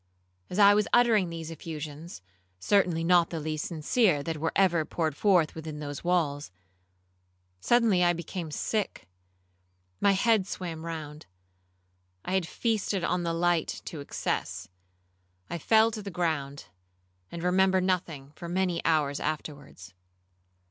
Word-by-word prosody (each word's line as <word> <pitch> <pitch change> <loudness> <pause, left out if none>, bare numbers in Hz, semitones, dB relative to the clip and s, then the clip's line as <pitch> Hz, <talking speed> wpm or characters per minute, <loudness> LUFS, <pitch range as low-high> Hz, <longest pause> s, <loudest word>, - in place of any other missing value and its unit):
As 180 - -5
I 205 -1 +7
was 210 0 +2
uttering 225 -7 +4
these 165 -1 -6
effusions, 155 - -8 0.4
(certainly 175 - +2
not 175 0 +4
the 165 - -4
least 155 0 -3
sincere 165 - +1
that 165 0 -3
were 160 +2 -1
ever 175 -4 +3
poured 155 -1 -2
forth 180 -4 +3
within 155 -1 -7
those 145 -1 -6
walls), 160 -5 0 1.1
suddenly 220 - +3
I 175 - +5
became 170 0 -5
sick,—my 90 - -4
head 205 0 +2
swam 170 -4 -6
round,—I 90 - -11
had 190 -3 +1
feasted 210 -4 -1
on 180 +1 0
the 170 -1 -1
light 170 -1 0
to 160 - -6
excess. 140 -8 -3 0.8
I 170 - -3
fell 220 +6 +4
to 215 -1 -5
the 200 - -6
ground, 155 -6 -2 0.7
and 170 - -6
remember 190 +1 +3
nothing 170 -7 -2
for 170 - -8
many 180 -1 0
hours 150 -3 +1
afterwards. 145 - -6
165 Hz, 130 wpm, -28 LUFS, 145-185 Hz, 1.1 s, I